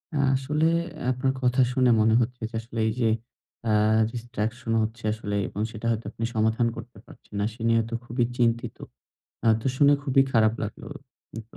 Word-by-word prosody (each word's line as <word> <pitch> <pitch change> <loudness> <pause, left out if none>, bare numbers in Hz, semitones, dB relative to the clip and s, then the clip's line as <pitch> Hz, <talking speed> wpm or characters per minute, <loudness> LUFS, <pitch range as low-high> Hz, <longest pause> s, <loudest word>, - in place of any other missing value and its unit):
আ - - +1 0.2
আসলে 150 +4 0 0.5
আপনার 130 +1 0
কথা 125 +1 +3
শুনে 125 -1 +4
মনে 110 +1 +4
হচ্ছে 125 +1 -3
যে, - - -27
আসলে 115 0 -7
এই - - +1
যে 115 -2 +3 0.5
অ্যা 110 -2 +1 0.4
distraction 120 0 -4
হচ্ছে 110 +1 -5
আসলে 105 -2 -4
এবং 105 - -5
সেটা 110 +1 -8
হয়তো 115 0 -2
আপনি 115 - -4
সমাধান 110 +2 +2
করতে 120 -4 -10
পারছেন - - -18
না। 100 - +1
সে 115 - -14
নিয়ে 115 0 +4
তো - - -7
খুবই 120 +1 0
চিন্তিত। 115 -1 0 0.7
আ - - +1 0.2
তো - - -4
শুনে 145 +1 +6
খুবই 135 -1 +4
খারাপ 110 -2 +4
লাগলো। 110 - -6 0.6
তো - - -16
115 Hz, 180 wpm, -26 LUFS, 110-125 Hz, 0.7 s, শুনে